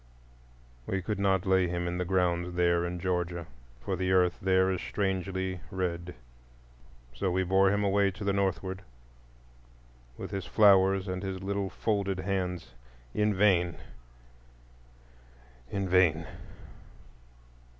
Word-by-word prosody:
We 95 -1 -2
could 105 +1 -3
not 95 -1 +2
lay 95 -1 +3
him 85 0 -2
in 90 +1 -3
the 90 - -1
ground 90 -1 0
there 85 -1 +2
in 90 0 -5
Georgia, 90 -2 -2 0.3
for 95 +10 -3
the 95 +1 -1
earth 90 -1 +3
there 95 0 +3
is 95 - -2
strangely 95 -1 -2
red; 90 -1 -3 1.0
so 65 +10 -1
we 95 +1 +1
bore 95 +1 +3
him 100 0 +1
away 100 0 +3
to 95 +2 -8
the 100 0 +1
northward, 95 -1 -1 1.4
with - - -7
his 100 -2 -4
flowers 95 -2 +4
and 90 0 -3
his 95 -1 -5
little 100 0 -2
folded 100 -3 -1
hands. 90 -6 -3 0.4
In 105 -1 +1
vain, 90 -3 +3 1.9
in 100 +2 -2
vain! 85 -4 +3
95 Hz, 130 wpm, -29 LUFS, 90-95 Hz, 1.9 s, flowers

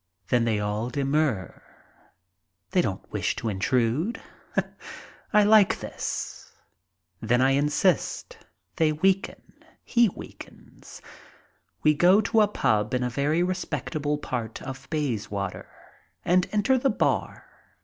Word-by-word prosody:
Then 120 -2 +2
they 110 -2 +1
all 105 +3 -2
demur. 135 -5 -1 1.1
They - - +3
don't - - -4
wish - - -1
to 115 - -3
intrude. 125 - 0 1.1
I 210 -1 +5
like 210 -1 +5
this. - - -6 0.7
Then 120 +2 +2
I 130 +1 +4
insist. 150 - 0 0.4
They 160 -3 +3
weaken. 190 +6 0 0.4
He 235 -3 +3
weakens. - - -13 0.8
We 155 - +5
go 180 +6 +5
to 220 +1 +2
a 210 - +5
pub. 110 - 0
in 125 - 0
a 125 - -2
very 150 +6 +1
respectable 155 -5 -2
part 120 -6 -5
of 135 0 -8
Bayswater 105 -10 -3 0.6
and 180 +1 +3
enter 250 +5 +2
the 270 - +2
bar. - - -1
150 Hz, 120 wpm, -26 LUFS, 120-185 Hz, 1.1 s, I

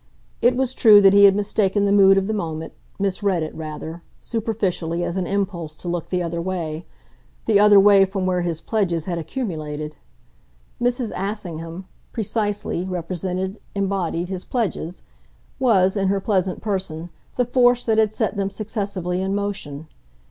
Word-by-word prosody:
It 245 +1 +4
was 260 0 0
true 215 -5 +7
that 195 -1 +6
he 200 0 +8
had 195 -1 +6
mistaken 205 0 +1
the 200 - +2
mood 195 -1 +6
of 195 - +2
the 220 - -2
moment, 160 -5 -4 0.2
misread 195 -3 0
it 155 - -5
rather, 160 +1 -7 0.2
superficially, 195 -7 -2
as 175 - -3
an 185 -2 -1
impulse 185 -6 -2
to 175 - -9
look 175 -1 -3
the 180 -1 0
other 170 0 -3
way 170 -3 -4 0.6
the 210 -3 +4
other 205 -1 +7
way 200 0 +7
from 190 0 -3
where 180 -1 +1
his 170 -2 -2
pledges 175 -7 -1
had 175 -2 -2
accumulated. 155 - -5 0.8
Mrs. 245 -1 0
Assingham, 180 -3 -5 0.3
precisely, 210 -4 -2
represented, 185 +2 -3 0.2
embodied 190 -3 -1
his 185 -1 -4
pledges 190 -7 -3 0.6
was, 195 -7 +3
in 195 -2 +1
her 195 +1 +1
pleasant 190 -2 0
person, 180 -5 -3 0.2
the 250 - +2
force 245 0 +3
that 220 -1 +2
had 215 -2 +3
set 220 0 -1
them 195 -1 -1
successively 195 -4 -3
in 190 +1 -1
motion. 160 -8 -4
190 Hz, 160 wpm, -22 LUFS, 170-205 Hz, 0.8 s, he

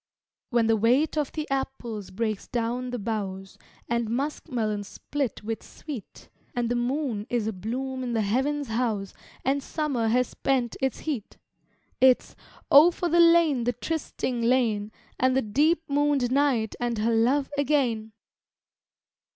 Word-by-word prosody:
When 235 -2 +2
the 225 0 +4
weight 245 +9 +2
of 300 -3 -1
the 310 -1 -3
apples 240 -6 -3
breaks 215 +1 -3
down 245 +1 -2
the 245 - -3
boughs, 195 -3 -4 0.3
And 235 -1 0
musk 280 +7 -2
melons 215 -5 -2
split 275 -4 -4
with 225 +1 -3
sweet, 280 -9 -9 0.3
And 240 -1 0
the 245 - +1
moon 240 -3 -1
is 240 -3 0
a 220 - -2
bloom 260 +7 -4
in 245 -2 -3
the 225 -2 +1
Heaven's 265 +6 0
house, 220 -4 -1 0.3
And 275 +2 +2
summer 275 -6 -1
has 250 +2 +2
spent 255 -4 0
its 265 -3 -1
heat 275 -10 -4 0.6
It's 255 0 +4 0.4
Oh, 295 +5 +9
for 350 0 -2
the 340 +2 +3
lane, 335 -6 +5
the 245 - +1
trysting 260 -4 -3
lane, 230 -4 +1 0.3
And 255 0 +3
the 265 - +2
deep 300 +10 +2
mooned 285 -3 +1
night 260 -6 +2
and 240 -1 -1
her 225 +2 +1
love 260 +6 +2
again! 255 -7 0
245 Hz, 150 wpm, -26 LUFS, 225-280 Hz, 0.6 s, Oh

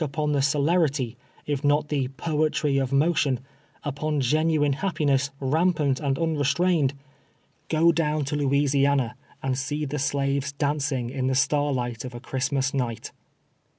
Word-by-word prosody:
upon 150 +1 -1
the 145 -2 +2
celerity, 145 -3 +1 0.3
ii" 145 - +1
not 145 +1 +2
the 140 -4 0
" 135 +1 -16
poetry 150 -2 +1
of 135 -1 -1
motion" 140 -3 +2 0.2
— - - -34
upon 150 +1 -2
genuine 150 +2 +2
liaj^piness, 140 -5 0
rmnpant 150 -1 +1
and 140 -3 -1
unrestrained 160 -1 +1 0.4
— - - -39 0.2
go 165 +1 +4
down 155 -3 0
to 145 - -2
Louisiana, 140 -3 +2 0.3
and 135 -1 0
see 145 +3 -2
the 145 +1 -3
shives 140 0 0
dancing 140 -4 -1
in 130 -1 -2
the 130 - +1
starlight 130 -4 0
of 125 -1 -7
a - - -6
Christmas 135 +2 -1
night. 120 -4 -3
140 Hz, 150 wpm, -25 LUFS, 135-150 Hz, 0.4 s, go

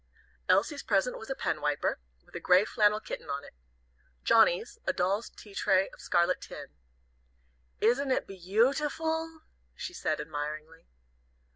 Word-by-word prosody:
Elsie's 290 -3 +3
present 205 +4 +1
was 220 - -10
a 270 - -1
pen - - -2
wiper, 150 -1 0 0.3
with - - -24
a - - -4
gray 185 +3 +5
flannel 210 -1 +3
kitten 220 - -7
on 140 0 -3
it. - - -14 0.7
Johnnie's, 450 - +4
a - - +2
doll's 195 +5 0
tea 205 - -14
tray 190 0 +2
of - - -14
scarlet 175 +1 +2
tin. - - -9 1.1
"Isn't 260 +5 +3
it 260 - +1
beau 195 +7 +2
ti 295 +1 -1
ful?" 320 +1 -3 0.3
she 360 - -6
said, 155 - -1
admiringly. 155 +2 -6
210 Hz, 150 wpm, -30 LUFS, 175-275 Hz, 1.1 s, gray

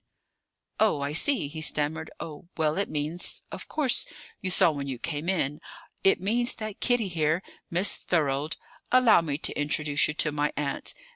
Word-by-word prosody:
"Oh, 215 -10 +3
I 140 +1 -2
see!" 240 - +2
he 155 +2 -7
stammered. 155 +1 0
"Oh, 155 0 -8
well, 155 +1 +1
it 200 - -1
means 155 +4 -1
of - - -7
course, 285 -6 +1 0.3
you 185 - -1
saw 175 -2 +5
when 140 -2 -5
you 130 -2 -4
came 150 +5 -4
in? 150 -5 -1 0.4
It 195 - +4
means 235 +6 +1
that 215 -2 -6
Kitty 245 -4 +2
here 165 0 0 0.3
Miss 180 +4 +3
Thorold, 150 -2 0 0.3
allow 255 -7 +6
me 145 -4 -2
to - - +1
introduce 145 0 +2
you 150 - -4
to 155 - +1
my 150 0 0
aunt. 140 -2 -2
160 Hz, 170 wpm, -27 LUFS, 145-190 Hz, 0.4 s, allow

